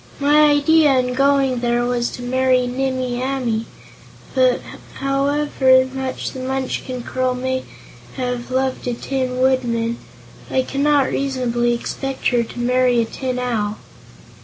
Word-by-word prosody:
My 295 +2 +5
idea 290 -1 +4
in 250 0 0
going 275 -1 +2
there 240 0 +1
was 245 -1 0
to 245 - -7
marry 255 0 +2
Nimmie 255 -1 -2
Amee, 250 -4 -1 0.7
but 255 -2 +3 0.4
however 275 -1 +2
much 265 -1 -4
the 260 - -8
Munchkin 255 -1 -3
girl 255 +1 -1
may 260 +1 -2 0.5
have 250 -1 -3
loved 260 0 -1
a 245 - -1
Tin 255 0 -3
Woodman, 235 -3 +1 0.5
I 260 - +1
cannot 280 0 +1
reasonably 240 -3 0
expect 270 +3 -3
her 245 -2 +2
to 235 +1 -7
marry 250 0 +2
a 230 - +2
Tin 255 +2 -4
Owl." 220 -4 -1
255 Hz, 135 wpm, -20 LUFS, 245-270 Hz, 0.7 s, My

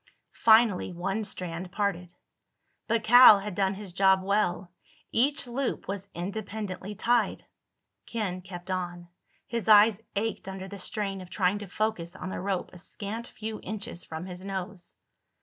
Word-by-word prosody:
Finally 220 -5 +5
one 195 +5 -2
strand 180 -2 -4
parted. 180 -3 -2 0.8
But 230 0 +1
Cal 245 -2 +9
had 200 0 -5
done 195 +1 +1
his 195 -3 -8
job 190 0 +4
well. 195 -2 0 0.4
Each 275 +5 +2
loop 250 +2 -3
was 200 0 -5
independently 200 +1 -5
tied. 240 +4 +1 0.6
Ken 195 -6 -3
kept 180 0 -8
on. 175 -1 -4 0.4
His 235 -4 -4
eyes 215 0 +7
ached 215 -1 -2
under 190 0 -6
the 200 +1 -9
strain 195 -1 -2
of 180 - -11
trying 190 +1 +1
to 205 - -7
focus 185 -3 -2
on 185 - -6
the - - -4
rope 190 -1 -2
a 180 - -11
scant 220 +6 -5
few 215 0 -6
inches 205 -3 -6
from 160 +2 -7
his 180 0 -8
nose. 190 -1 -6
195 Hz, 150 wpm, -28 LUFS, 180-215 Hz, 0.8 s, Cal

